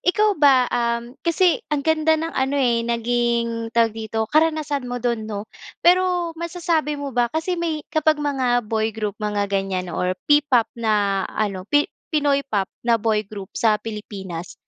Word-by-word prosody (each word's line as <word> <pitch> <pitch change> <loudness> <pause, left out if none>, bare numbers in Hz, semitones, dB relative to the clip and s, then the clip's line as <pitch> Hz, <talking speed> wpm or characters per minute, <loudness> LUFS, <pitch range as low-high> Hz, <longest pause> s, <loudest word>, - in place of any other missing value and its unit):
ikaw 420 +3 +3
ba, 270 -3 +6
um, 235 0 -1
kasi 340 +1 +2
ang 295 -2 -1
ganda 320 0 +3
ng 325 +1 -3
ano, 265 +2 0
eh, 240 -4 +2
naging 235 0 0
tawag 230 -1 +3
dito 220 0 -3
karanasan 305 -4 +1
mo 245 - -3
dun 235 -3 -2
no? 205 -1 -4 0.4
Pero 355 -1 +3
masasabi 335 -3 -1
mo 285 -1 -5
ba 240 0 +2
kasi 320 +7 -2
may 315 -3 -2
kapag 310 0 +3
mga 260 -5 0
boy 220 0 -1
group 210 -2 -2
mga 210 -1 0
ganiyan 190 -2 -1
or 180 +2 -1
P-pop 290 -6 +3
na 205 -4 +1
ano 195 -3 -3
pi 290 0 +4 0.2
Pinoy 290 -3 +2
pop 200 -5 -1 0.2
na 235 - +5
boy 215 -2 0
group 200 -3 -8
sa 220 -2 +2
Pilipinas, 195 -5 -7
240 Hz, 165 wpm, -22 LUFS, 215-300 Hz, 0.4 s, ba